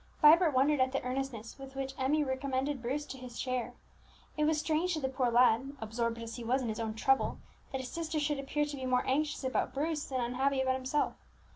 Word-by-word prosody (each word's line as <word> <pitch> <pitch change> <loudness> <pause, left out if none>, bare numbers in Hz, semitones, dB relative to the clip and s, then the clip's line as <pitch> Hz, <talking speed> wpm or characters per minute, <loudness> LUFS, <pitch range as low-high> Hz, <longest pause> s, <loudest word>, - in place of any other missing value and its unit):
Vibert 315 0 +7
wondered 280 +3 +4
at 260 +1 +2
the 270 - -1
earnestness 250 -2 -4
with 270 0 -10
which 270 0 -3
Emmie 290 +3 +2
recommended 265 0 -1
Bruce 275 +5 -2
to 265 - -8
his 250 -2 -8
care; 250 -1 -2 0.6
it 300 - +1
was 310 0 +2
strange 325 +3 +1
to - - -2
the 265 - -1
poor 260 -2 0
lad, 245 +3 +4
absorbed 230 +1 -2
as 230 +1 -6
he 240 - -6
was 255 +3 +1
in 235 - -2
his 215 - -3
own 220 -1 -2
trouble, 270 +4 +2 0.3
that 265 - -2
his 255 - -7
sister 325 -1 -2
should 295 -1 0
appear 285 +2 0
to 290 0 -5
be 260 -2 -4
more 250 -1 +2
anxious 295 +2 0
about 260 +1 -1
Bruce 305 +1 -1
than 260 -1 -2
unhappy 260 +3 0
about 260 0 +2
himself. 260 +3 0
265 Hz, 225 wpm, -32 LUFS, 250-295 Hz, 0.6 s, Vibert